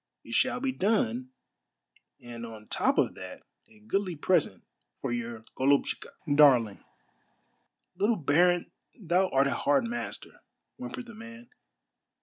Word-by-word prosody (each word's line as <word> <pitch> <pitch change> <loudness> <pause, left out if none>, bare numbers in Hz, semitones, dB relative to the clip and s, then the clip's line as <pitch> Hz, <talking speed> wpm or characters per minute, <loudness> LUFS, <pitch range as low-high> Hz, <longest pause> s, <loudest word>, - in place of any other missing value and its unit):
It - - -9
shall - - +2
be 265 0 0
done, 130 - 0 0.9
and 120 -1 -9
on 110 -2 -9
top - - +1
of - - +2
that - - -9 0.3
a 110 - -20
goodly 185 - -1
present 150 - +1 0.4
for 135 - -3
your 115 -2 -4
yoluhtchika 140 +2 +2 0.3
(darling)." 125 -8 +5 1.1
"Little 205 +5 +2
baron, 175 +2 +2 0.3
thou 185 0 +2
art 135 +1 +3
a 140 - +1
hard 145 +7 +2
master," 235 +1 -6 0.4
whimpered 255 0 -6
the 235 - -11
man. 230 +2 -12
150 Hz, 130 wpm, -29 LUFS, -, 1.1 s, darling